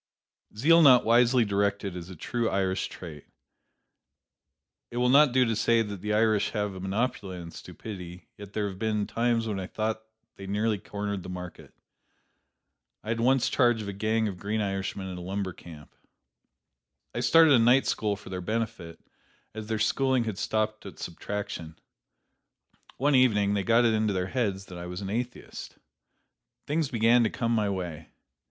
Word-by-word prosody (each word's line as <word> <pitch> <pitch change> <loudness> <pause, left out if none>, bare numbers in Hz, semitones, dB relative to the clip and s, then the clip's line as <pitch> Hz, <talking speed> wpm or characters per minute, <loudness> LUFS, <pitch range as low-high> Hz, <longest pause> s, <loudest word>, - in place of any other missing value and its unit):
Zeal 165 +8 +5
not 130 -5 +7
wisely 120 +1 +4
directed 100 -1 -1
is 90 0 -7
a 95 - -9
true 115 +7 -2
Irish 95 -1 0
trait. 80 -5 -10 1.6
It 120 - -7
will 125 0 +2
not 140 +1 +6
do 130 0 +4
to 115 -1 0
say 115 +1 +3
that 100 -3 -7
the 105 +1 -3
Irish 110 -1 +2
have 105 -1 -1
a 95 - -8
monopoly 95 -1 -2
on 85 -1 -8
stupidity, 90 -4 -9
yet 100 -1 -11
there 105 -1 -1
have 95 -1 -8
been 105 -2 0
times 115 0 0
when 105 -3 -2
I 95 - -5
thought 110 +1 -2 0.4
they 95 - -8
nearly 105 +1 0
cornered 100 0 -4
the 90 - -9
market. 90 -1 -9 1.3
I 110 - -1
once 125 +3 +2
had - - -4
charge 120 -4 +3
of - - -7
a 100 - -4
gang 110 +2 0
of 95 -3 -6
green 105 +2 -2
Irishmen 95 -1 -3
at 90 -1 -6
a - - -7
lumber 95 +1 -3
camp. 80 -4 -13 1.2
I - - -3
started 165 -2 +6
a 125 - +6
night 120 +4 +5
school 105 -2 0
for 100 - -12
their 90 -1 -4
benefit, 110 -4 -4 0.5
as 110 -1 -7
their 110 0 -1
schooling 130 +3 +1
had 110 -4 -4
stopped 110 0 -1
at 95 - -11
subtraction. 85 -3 -6 1.2
One 145 +3 +2
evening 105 -6 +4
they 100 - +1
got 115 +3 +4
it 115 - +3
into 110 -1 +1
their 90 -1 -1
heads 100 -7 -1
that 90 -2 -9
I 85 - -6
was 90 +2 -6
an 100 0 -4
atheist. 120 +3 -5 0.9
Things 150 -1 0
began 115 0 +4
to 110 - +2
come 115 -1 -2
my 105 -3 +1
way. 85 -5 -5
105 Hz, 175 wpm, -27 LUFS, 95-115 Hz, 1.6 s, not